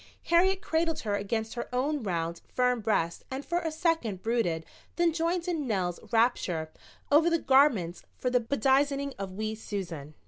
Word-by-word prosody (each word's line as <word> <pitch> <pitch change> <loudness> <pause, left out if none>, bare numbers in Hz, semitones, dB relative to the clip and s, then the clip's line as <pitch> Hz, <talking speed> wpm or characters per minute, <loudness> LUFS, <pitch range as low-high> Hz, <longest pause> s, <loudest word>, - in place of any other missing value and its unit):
Harriet 380 +3 +4
cradled 325 -3 0
her 210 -3 -2
against 220 +2 -2
her 240 - -5
own 280 +4 0
round, 170 -4 -2
firm 250 -1 +2
breast 195 -6 0
and 265 +2 -5
for 345 +1 0
a 330 -2 -3
second 310 - 0
brooded 185 -9 0 0.3
then 340 -1 +2
joined 340 +2 -1
in 320 -6 -1
Nell's 185 -5 -1
rapture 190 -9 +1 0.4
over 315 +4 +6
the 335 - +3
garments 265 - +3 0.2
for 250 - -1
the 250 - +4
bedizening 275 +3 +1
of 195 -1 -5
wee 215 +1 -2
Susan. 175 -9 -6
245 Hz, 165 wpm, -29 LUFS, 195-310 Hz, 0.4 s, over